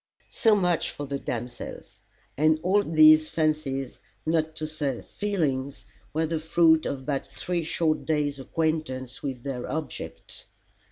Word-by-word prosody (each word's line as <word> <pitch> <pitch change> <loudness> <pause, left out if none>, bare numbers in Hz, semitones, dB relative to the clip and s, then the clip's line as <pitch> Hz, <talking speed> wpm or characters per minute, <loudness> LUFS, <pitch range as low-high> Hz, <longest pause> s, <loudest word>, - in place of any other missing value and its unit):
So 220 -3 +4
much 180 -4 +1
for 145 - -6
the 140 0 -3
damsels. 120 -1 -6 0.4
And 155 +2 +3
all 195 +3 +4
these 155 -2 +6
fancies, 150 -4 -1 0.3
not 160 -1 +1
to 155 - -2
say 150 -5 -3
feelings, 145 -10 -2 0.3
were 160 +1 0
the 160 0 -1
fruit 160 0 +4
of 135 -1 -4
but 140 -2 -2
three 175 -2 -3
short 160 0 0
days' 145 -3 0
acquaintance 135 -4 -2
with 130 -4 -4
their 130 -3 -4
objects. 155 -4 -6
155 Hz, 135 wpm, -26 LUFS, 135-160 Hz, 0.4 s, these